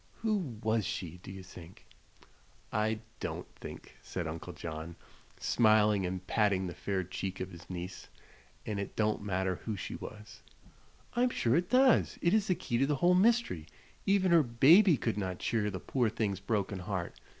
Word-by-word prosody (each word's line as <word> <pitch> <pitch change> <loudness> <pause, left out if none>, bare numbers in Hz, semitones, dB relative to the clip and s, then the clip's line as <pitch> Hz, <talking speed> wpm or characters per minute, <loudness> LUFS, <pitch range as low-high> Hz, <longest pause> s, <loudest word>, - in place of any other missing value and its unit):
Who 195 - -1
was 110 0 +2
she, 90 -6 -4
do 95 - -9
you 95 -1 -8
think?" 90 -1 -13 0.9
"I 110 0 0 0.2
don't - - -4
think," - - -10
said 90 - -4
Uncle 80 +3 -5
John, 80 0 -6 0.4
smiling 105 -4 +4
and 95 +1 -5
patting 100 -2 +2
the 90 - -4
fair 95 0 -2
check 95 +1 -5
of 95 +1 -4
his 85 -1 -12
niece. 90 0 -6 0.6
"And 105 -2 -2
it 100 - -5
don't 110 -1 +1
matter 95 -2 -1
who 110 - -4
she - - -5
was." 105 +1 -9 0.7
"I'm 245 +2 +3
sure 120 - +1
it 175 +3 +1
does. 255 +1 +4
It 170 - +2
is 215 -1 +3
the 185 - +2
key 120 -6 -2
to 135 - +3
the 145 - +1
whole 175 +6 +4
mystery. 195 - +2 0.4
Even 195 -2 +3
her 170 -1 +7
baby 150 - +6
could 115 -3 -1
not 95 -2 -3
cheer 105 0 0
the 95 -2 -5
poor 120 +1 0
thing's 105 -4 -1
broken 100 -1 -1
heart. 90 -2 -3
105 Hz, 175 wpm, -32 LUFS, 95-135 Hz, 0.9 s, her